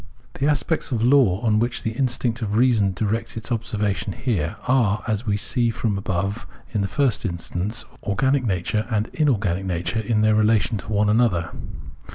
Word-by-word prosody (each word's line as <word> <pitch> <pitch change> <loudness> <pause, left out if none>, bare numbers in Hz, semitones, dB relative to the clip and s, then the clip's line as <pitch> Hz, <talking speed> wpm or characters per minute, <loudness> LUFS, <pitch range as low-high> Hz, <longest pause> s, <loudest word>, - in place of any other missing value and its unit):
The 140 - +2
aspects 150 +1 -1
of 115 -3 0
law 120 -7 +4
on 110 -3 +2
which 120 +2 -1
the 110 - -1
instinct 120 -1 -1
of 105 -2 -2
reason 115 -5 +3
directs 115 +4 -2
its 115 +3 -5
observation 105 -4 -1
here, 95 - -2
are, 115 -6 +2
as 110 +1 -1
we 100 -1 +1
see 120 +3 +2
from 115 -1 -1
the 100 - -2
above, 95 +4 -2 0.3
in 105 - 0
the 100 - 0
first 130 +2 +1
instance 95 +3 -3 0.2
organic 130 +7 +1
nature 105 +1 -1
and 110 -1 0
in 155 -2 +1
organic 100 -6 0
nature 85 +3 -2
in 110 0 0
their 110 0 +4
relation 110 0 +2
to 110 - -8
one 105 0 +2
another. 105 -7 +2
110 Hz, 185 wpm, -23 LUFS, 100-120 Hz, 0.3 s, law